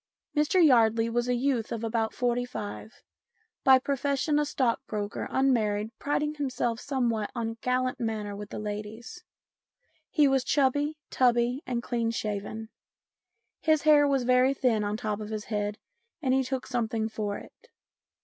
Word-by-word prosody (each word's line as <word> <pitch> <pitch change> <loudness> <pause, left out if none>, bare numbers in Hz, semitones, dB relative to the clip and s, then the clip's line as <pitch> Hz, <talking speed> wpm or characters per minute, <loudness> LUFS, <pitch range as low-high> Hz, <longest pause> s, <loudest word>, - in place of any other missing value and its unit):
Mr 300 +5 +3
Yardley 230 -4 +4
was 240 +1 0
a 250 - +2
youth 245 -3 0
of 230 -1 -3
about 225 -1 0
forty 245 0 0
five, 220 -1 -7 0.6
by 265 0 +8
profession 280 +2 0
a 300 - +1
stockbroker, 230 -6 -2
unmarried, 220 -5 +1
priding 295 +1 0
him 290 -3 -2
self 240 -2 -1
somewhat 235 -7 -1
on 230 -2 -1
a - - -8
gallant 255 0 0
manner 215 -3 -3
with 205 0 -8
the - - -6
ladies. 215 +9 -6 0.9
He 300 -5 +4
was 270 -1 +2
chubby, 290 +3 +1
tubby, 245 +1 +2
and 240 -2 -2
clean 235 -2 -1
shaven. 215 0 -4 0.9
His 310 -2 +2
hair 300 -2 +6
was 275 -2 +1
very 255 +2 +4
thin 235 -6 +1
on 205 0 -1
the - - -7
top 210 -1 -1
of 210 -1 -6
his 215 -1 -4
head 210 -1 -2 0.4
and 265 -5 +1
he 265 - +3
took 260 0 -3
something 225 -3 -1
for 210 -2 -3
it. 485 - -15
240 Hz, 160 wpm, -28 LUFS, 220-270 Hz, 0.9 s, by